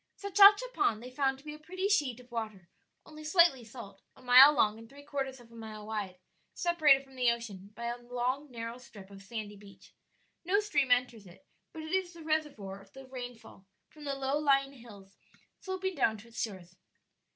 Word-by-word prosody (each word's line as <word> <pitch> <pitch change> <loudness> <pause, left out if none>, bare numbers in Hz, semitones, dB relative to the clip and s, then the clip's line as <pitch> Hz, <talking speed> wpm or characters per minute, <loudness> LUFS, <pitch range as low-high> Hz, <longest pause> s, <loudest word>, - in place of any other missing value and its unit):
Sachacha 405 +3 +6
Pond 230 - 0
they 250 - -9
found 270 0 0
to 270 - -18
be 300 - -6
a 300 - -11
pretty 370 +5 -3
sheet 290 - +1
of 250 0 -17
water 215 -6 -5 0.4
only 310 0 -12
slightly 310 -5 +4
salt, 215 -4 -11
a - - -18
mile 255 +3 +9
long 220 -6 +1
and 225 0 -13
three 285 +2 -14
quarters 270 -2 -4
of 235 -1 -18
a - - -15
mile 215 -2 -9
wide, 205 -4 -4 0.4
separated 310 -6 +4
from 270 -1 -19
the 250 -2 +3
ocean 220 -5 -4
by 235 +1 -6
a 240 +1 -4
long 250 +4 -3
narrow 230 0 -7
strip 205 -5 -14
of 195 0 -12
sandy 210 0 -7
beach. 200 -1 -17 0.5
No 375 +4 +2
stream 290 -11 0
enters 245 -4 +1
it, 180 +11 -17 0.3
but 320 - -8
it 315 - -7
is 370 -1 -1
the 335 -1 -12
reservoir 285 -12 -3
of 195 0 -20
the 270 0 -11
rainfall 245 -6 -10 0.2
from 300 -1 -13
the 280 -1 -2
low 275 +2 -1
lying 275 -2 +2
hills 205 -6 -15 0.4
sloping 380 0 -3
down 225 -8 +1
to 225 +3 -15
its 225 - -6
shores. 185 -5 -6
250 Hz, 200 wpm, -31 LUFS, 220-300 Hz, 0.5 s, mile